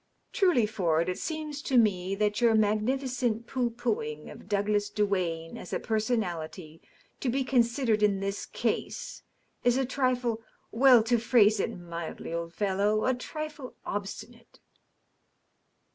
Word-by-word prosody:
Truly, 350 - +3
Ford, 175 -6 0
it 180 - -3
seems 310 -2 -4
to 270 -4 +1
me 195 -4 +2
that 210 +2 0
your 230 -2 +5
magnificent 230 +2 0
pooh 245 0 -1
poohing 215 -11 -3
of - - -13
Douglas 205 0 +1
Duane 185 -6 -1
as - - -9
a - - 0
per 220 -1 0
sonality 175 -7 -3 0.4
to 260 - -1
be 265 +3 +1
considered 235 -3 +2
in 205 -2 +3
this 195 +1 -3
case - - -3 0.4
is 245 +1 +3
a 265 - +1
trifle 250 -3 0
•. - - -23 0.3
well, 250 -1 +6
to 235 +1 +2
phrase 220 -2 +4
it - - -2
mildly, 170 -1 -6
old 170 0 -3
fellow, 205 +1 +1
a 260 - +3
trifle 300 +1 -6
obstinate." 205 +4 -6
220 Hz, 145 wpm, -28 LUFS, 195-250 Hz, 0.4 s, well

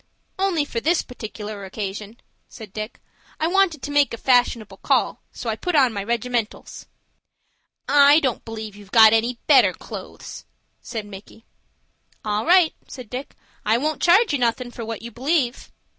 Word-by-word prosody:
"Only 365 -6 +1
for 235 - -3
this 320 +7 +1
partic'lar 215 -4 -8
occasion," 205 +3 -6 0.3
said 215 -4 -12
Dick. 215 +1 -6 0.4
"I 315 - 0
wanted 350 -4 +2
to 290 - -4
make 290 -4 +2
a - - -13
fashionable 245 -3 +1
call, - - 0
so 245 - -8
I 220 - 0
put 355 +9 -3
on 260 -5 +4
my 200 -1 -3
regimentals." 235 0 -3 1.0
"I 285 +1 +6
don't 260 -6 -2
b'lieve 220 -2 -7
you've 205 -1 -14
got 220 0 +7
any 235 +2 +1
better - - +5
clo'es," - - -9 0.4
said 220 -3 -6
Micky. 205 +3 -13 0.8
"All 210 +5 -1
right," 350 -2 +5
said 250 -5 -10
Dick, 255 +2 -6 0.3
"I 220 +2 +2
won't 305 +5 -2
charge 380 +3 +4
you 285 - 0
nothin' 245 +1 -1
for 235 - -7
what 225 -1 -6
you 235 - -7
believe." 260 +1 -1
240 Hz, 160 wpm, -22 LUFS, 220-290 Hz, 1.0 s, got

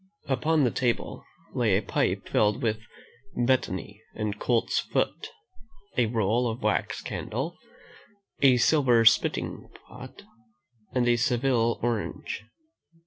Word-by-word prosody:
Upon 150 +2 +1
the 125 - +2
table 120 -2 -2 0.3
lay - - +2
a - - -2
pipe - - -1
filled 105 +5 +1
with 110 -2 0 0.6
betony 120 -7 -1
and 105 -1 -3
colt's 120 -2 +1
foot, 440 - -2 0.7
a 120 -2 +2
roll 115 +2 +1
of 115 +1 -6
wax 105 -1 -1
candle, 135 +10 -4 0.9
a 130 -3 +6
silver 125 -3 +4
spitting 115 - +2 0.2
pot, - - -12 0.7
and 125 -1 +1
a 120 0 +4
Seville 120 -1 +1
orange. 120 -3 -3
120 Hz, 115 wpm, -27 LUFS, 115-130 Hz, 0.9 s, a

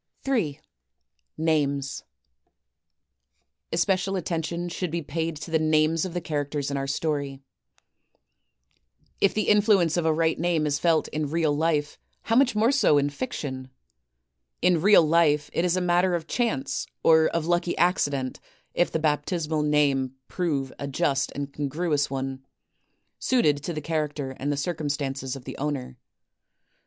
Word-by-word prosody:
J. 195 - 0 0.8
Names 145 -3 0 1.7
Especial 185 +2 +1
attention 170 -1 -2
should 175 +1 -3
be 170 +1 -3
paid 160 +2 -3
to 155 +3 -8
the 160 - +3
names 155 +1 +2
of 180 -2 -6
the 175 - -1
characters 145 -2 -2
in - - -2
our 135 0 -2
story. 140 -1 -2 1.8
If 200 - +2
the 215 - 0
influence 200 -6 +4
of 165 -2 +1
a - - +4
right 160 +1 +1
name 165 -2 +1
is 145 -1 0
felt 165 -1 +2
in 150 -1 -2
real 155 -2 +1
life, 150 -1 0 0.2
how 225 - 0
much 255 -2 +4
more 225 +4 +3
so 275 - +4
in 145 0 +1
fiction! 140 - -5 0.9
In 180 -2 +3
real 200 -1 +7
life 155 -2 +2
it 165 - +1
is 180 +1 +1
a - - 0
matter 180 +1 +2
of 165 -2 -3
chance 165 - -1 0.2
or 160 -1 +6
of 165 -2 -2
lucky 175 0 0
accident 145 -7 +1 0.3
if 175 - +1
the - - 0
baptismal 155 +1 0
name 140 -3 +1
prove 145 -7 -2
a 140 - -4
just 140 -1 0
and 140 0 -5
con 145 -1 -2
gruous 150 0 0
one, 135 0 -4 0.8
suited 195 - +2
to 160 - -4
the 155 -2 -4
character 150 -3 -2
and 145 +2 -1
the 145 - -1
circumstances 140 -4 -3
of 135 - -10
the - - -7
owner. 135 -3 -3
155 Hz, 150 wpm, -26 LUFS, 145-175 Hz, 1.8 s, real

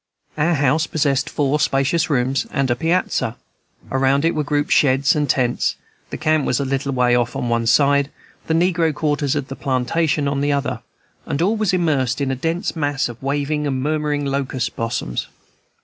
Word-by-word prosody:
Our 160 +3 +2
house 150 +3 +2
possessed 140 -4 0
four 145 +1 0
spacious 150 +3 +1
rooms 135 -1 0
and 135 -2 0
a - - +2
piazza; 165 -6 0 0.5
around 135 +2 +2
it 165 - +2
were 150 - -1
grouped 145 +1 -1
sheds 135 +3 +4
and 150 -1 0
tents; 125 -2 +1 0.3
the - - -5
camp 155 -1 +1
was 125 - 0
a 140 - -1
little 135 +1 -1
way 125 -2 +2
off 120 -1 +1
on 120 - -2
one 115 -1 0
side, 140 +2 +3 0.4
the 160 - +1
negro 165 -2 +2
quarters 145 -2 0
of 145 -2 -2
the 135 - -6
plantation 140 +3 0
on 140 0 -1
the 145 0 +1
other; 140 -1 -2 0.5
and 140 - -2
all 195 +7 +2
was 215 -3 +1
immersed 145 -8 +1
in 140 -2 0
a - - -1
dense 165 +8 -2
mass 145 -4 -1
of 120 -1 -10
waving 145 +2 -1
and 130 -2 -2
murmuring 150 -1 -1
locust 135 -3 -2
blossoms. 115 - -3
140 Hz, 185 wpm, -20 LUFS, 130-155 Hz, 0.5 s, sheds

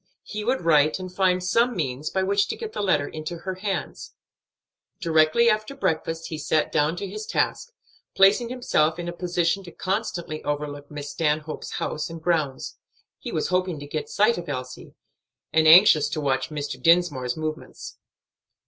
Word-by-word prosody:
He 210 0 -6
would 255 +4 0
write 155 -2 +4
and 185 -1 -8
find 185 -1 +2
some 230 +7 +2
means 145 -3 -2
by 190 - 0
which 200 +1 +2
to - - -3
get 440 -1 -7
the - - -3
letter 150 -8 +1
into 155 +2 -6
her 190 +3 -5
hands. 195 +1 -5 0.8
Directly 165 +6 +3
after 215 +4 +1
breakfast 165 - -2
he 160 - -5
sat 155 0 0
down 150 +2 +1
to 195 +3 -5
his 210 +3 -7
task, 480 - -1 0.4
placing 205 +5 +5
himself 165 -11 +1
in 175 0 -5
a 175 - -4
position 175 +1 -1
to 175 - -11
constantly 180 -6 -3
overlook 145 -1 -4
Miss 145 -1 -7
Stanhope's 155 0 -2
house 155 +2 -3
and 165 0 -8
grounds. 155 -5 -2 0.4
He - - -6
was - - -1
hoping 180 -3 0
to 145 - -8
get 150 +1 -5
sight 215 0 +2
of 170 - -8
Elsie, 130 -2 -6 0.6
and 160 0 +4
anxious 160 -3 +7
to - - -3
watch 130 -3 0
Mr. 145 -4 -5
Dinsmore's 155 -6 +2
movements. 155 0 -6
165 Hz, 170 wpm, -24 LUFS, 150-190 Hz, 0.8 s, anxious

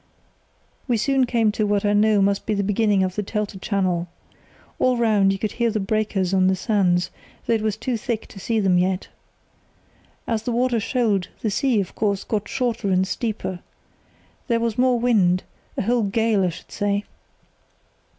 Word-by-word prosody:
"We 240 -3 +2
soon 265 +3 +2
came 230 -3 +2
to 210 0 -1
what 205 0 +1
I 205 - +3
knew 210 -1 +4
must 200 0 0
be 215 - +1
the 200 - 0
beginning 205 -1 +2
of 185 -1 -1
the 210 - -2
Telte 205 -1 -4
channel. 185 -4 0 0.7
All 255 -1 +3
round 210 -4 +3
you 195 - -1
could 210 +2 -2
hear 235 -1 0
the 215 -1 -1
breakers 195 -2 -1
on 185 -1 +4
the 190 - +3
sands, 185 -3 +1 0.3
though - - +1
it 225 - +1
was 215 -1 -1
too 245 +1 -2
thick 225 0 -3
to 195 - -11
see 225 +3 0
them 190 -3 +3
yet. 185 +1 -1 1.2
As 225 -2 -1
the 240 - -3
water 240 0 +1
shoaled, 215 -5 0
the 215 - -1
sea, 245 +1 +1
of 190 - -3
course, 200 -2 -1
got 210 -2 -2
shorter 235 -5 -1
and 185 0 +2
steeper. 205 -5 -3 0.9
There 235 -3 +2
was 230 -2 -1
more 250 0 +3
wind—a 200 -9 0
whole 240 +3 +2
gale 215 0 +1
I - - +1
should 175 +1 -11
say. 205 0 -1
210 Hz, 180 wpm, -22 LUFS, 195-230 Hz, 1.2 s, knew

